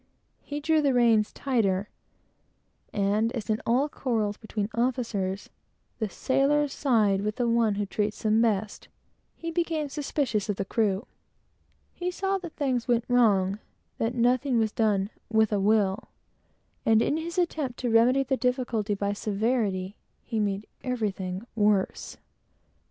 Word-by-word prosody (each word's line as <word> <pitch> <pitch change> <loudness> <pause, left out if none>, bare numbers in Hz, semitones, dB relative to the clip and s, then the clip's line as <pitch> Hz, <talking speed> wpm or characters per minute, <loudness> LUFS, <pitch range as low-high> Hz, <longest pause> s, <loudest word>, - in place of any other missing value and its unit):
He 290 0 -5
drew 315 +1 +2
the 275 -3 +2
reins 225 -3 +4
tauter; 205 -8 0 1.1
and 210 +3 +1
as, 225 -2 -3
in 215 - 0
all 255 +5 +3
quarrels 225 -8 -1
between 215 -1 -4
officers, 230 -6 -1 0.5
the 220 -3 -1
sailors 280 +5 +1
side 215 -8 +2
with 210 +1 -2
the 245 - 0
one 230 -3 +2
who 205 0 -1
treats 210 +2 -2
them 220 +1 +3
best, 215 -2 -1 0.5
he 330 0 -5
became 325 -3 -1
suspicious 275 -8 -1
of 205 - +1
the 195 - -3
crew. 210 +1 0 0.9
He 355 0 -3
saw 390 +2 -1
that 345 -3 -8
everything 260 -4 +1
went 235 -1 +2
wrong 205 -5 +3 0.4
that 230 +2 -1
nothing 250 +2 +2
was 220 -2 +2
done 210 -2 +1 0.2
"with 220 -1 +3
a 205 - +1
will;" 205 -1 +2 0.8
and 220 -1 +4
in 300 - 0
his 335 +2 -5
attempt 310 -8 -1
to 245 -2 0
remedy 245 +4 +4
the 265 0 -1
difficulty 245 -5 0
by 200 0 -1
severity, 205 -2 -1 0.3
he 225 -3 -3
made 205 0 -1 0.2
everything 200 -6 -3
worse. 205 -3 +1
225 Hz, 145 wpm, -27 LUFS, 205-260 Hz, 1.1 s, reins